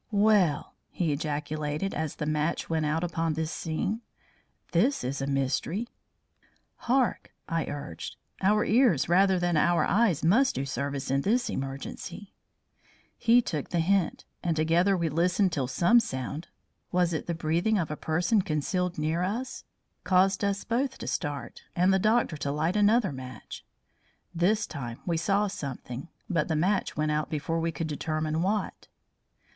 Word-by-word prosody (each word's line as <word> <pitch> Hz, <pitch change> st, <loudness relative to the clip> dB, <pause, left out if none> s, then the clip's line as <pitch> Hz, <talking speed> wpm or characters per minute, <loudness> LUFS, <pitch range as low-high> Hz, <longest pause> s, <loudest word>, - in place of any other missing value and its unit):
"Well!" 205 Hz, -8 st, +3 dB, 0.2 s
he 170 Hz, -4 st, -1 dB
ejaculated, 150 Hz, +3 st, -2 dB
as 155 Hz, -2 st, -3 dB
the 150 Hz, -, -3 dB
match 155 Hz, +2 st, -1 dB
went 160 Hz, -2 st, +1 dB
out 160 Hz, +3 st, 0 dB
upon 165 Hz, -2 st, -1 dB
this 160 Hz, +1 st, -2 dB
scene. 180 Hz, +8 st, -2 dB, 0.7 s
"This 235 Hz, +12 st, +2 dB
is 130 Hz, +2 st, -3 dB
a 135 Hz, -, -2 dB
mystery." 140 Hz, -, -1 dB, 0.9 s
"Hark!" 250 Hz, -3 st, 0 dB
I 165 Hz, -1 st, -1 dB
urged; 140 Hz, -, -6 dB, 0.3 s
"our 210 Hz, +2 st, +3 dB
ears 225 Hz, -, +4 dB
rather 190 Hz, +2 st, +4 dB
than 175 Hz, -1 st, +1 dB
our 170 Hz, +3 st, +3 dB
eyes 200 Hz, -8 st, +2 dB
must 235 Hz, +12 st, +4 dB
do 135 Hz, -, -1 dB
service 140 Hz, 0 st, -3 dB
in 135 Hz, 0 st, +2 dB
this 240 Hz, -, +1 dB
emergency." 135 Hz, +9 st, -6 dB, 0.8 s
He 240 Hz, +1 st, +4 dB
took 150 Hz, -8 st, -3 dB
the 175 Hz, -, 0 dB
hint, 185 Hz, +1 st, +1 dB, 0.2 s
and 170 Hz, -2 st, 0 dB
together 170 Hz, +5 st, +3 dB
we 170 Hz, -1 st, 0 dB
listened 180 Hz, +5 st, +2 dB
till 140 Hz, -6 st, -1 dB
some 175 Hz, -, +4 dB
sound 150 Hz, -, -4 dB, 0.4 s
was 175 Hz, -1 st, +2 dB
it 160 Hz, -, -3 dB
the 170 Hz, -, -1 dB
breathing 170 Hz, +7 st, +1 dB
of 165 Hz, -5 st, -1 dB
a -, -, -2 dB
person 175 Hz, +8 st, +1 dB
concealed 180 Hz, +3 st, -1 dB
near 155 Hz, +3 st, 0 dB
us? 230 Hz, +7 st, -3 dB, 0.4 s
caused 190 Hz, +1 st, +3 dB
us 200 Hz, 0 st, 0 dB
both 260 Hz, +3 st, -1 dB
to -, -, -7 dB
start 145 Hz, -4 st, -4 dB
and 180 Hz, +2 st, +4 dB
the 190 Hz, -, +3 dB
doctor 215 Hz, -5 st, +2 dB
to 140 Hz, -1 st, -2 dB
light 160 Hz, +6 st, 0 dB
another 210 Hz, -1 st, +4 dB
match. 130 Hz, -1 st, -9 dB, 0.7 s
This 185 Hz, +6 st, +2 dB
time 120 Hz, -6 st, -6 dB
we 170 Hz, -, 0 dB
saw 200 Hz, +5 st, +2 dB
something, 140 Hz, -8 st, -6 dB, 0.2 s
but 165 Hz, -4 st, 0 dB
the 160 Hz, -, 0 dB
match 185 Hz, +4 st, 0 dB
went 155 Hz, 0 st, +1 dB
out 150 Hz, -1 st, -1 dB
before 160 Hz, +2 st, -1 dB
we 165 Hz, 0 st, 0 dB
could 160 Hz, +1 st, -3 dB
determine 155 Hz, +1 st, -2 dB
what. 205 Hz, +4 st, -2 dB
170 Hz, 160 wpm, -28 LUFS, 150-200 Hz, 0.9 s, ears